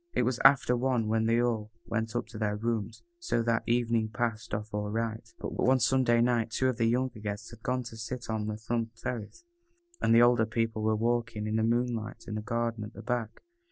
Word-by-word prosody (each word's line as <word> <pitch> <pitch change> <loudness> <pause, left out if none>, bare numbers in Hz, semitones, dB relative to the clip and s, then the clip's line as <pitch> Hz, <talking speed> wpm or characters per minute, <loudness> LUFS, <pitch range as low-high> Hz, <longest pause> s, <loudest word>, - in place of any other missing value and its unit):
It - - +2
was 125 -1 0
after 135 -2 +6
one 120 -2 +1
when 110 0 +2
they 115 +1 +3
all 115 -3 0 0.2
went 115 0 -2
up 120 - 0
to 110 - -8
their 105 -1 0
rooms, 110 0 -3 0.2
so 235 - 0
that 115 0 +2
evening 115 -2 +1
passed 115 -1 -2
off 105 0 -4
all 105 0 -2
right. 110 0 -3
But - - -4
on 130 +1 +2
Sunday 120 0 +3
night 120 -2 +2
two 130 +3 +1
of 125 - -2
the 115 -1 +2
younger 125 0 0
guests 105 +1 -5
had 115 -1 -13
gone 125 +2 -1
to 115 -1 -9
sit 120 +2 -5
on 110 -1 -2
the 105 0 -3
front 115 +1 -2
terrace, 115 - -6 0.6
and - - +2
the 120 - +8
older 120 -2 +4
people 115 -1 -1
were 110 0 +2
walking, 115 -1 0
in 110 +1 0
the - - +2
moonlight, 115 -1 -1
in 110 - -4
the 110 - -2
garden 115 0 -2
at 105 +2 -8
the 105 - -10
back. 120 -2 -3
115 Hz, 225 wpm, -30 LUFS, 110-120 Hz, 0.6 s, the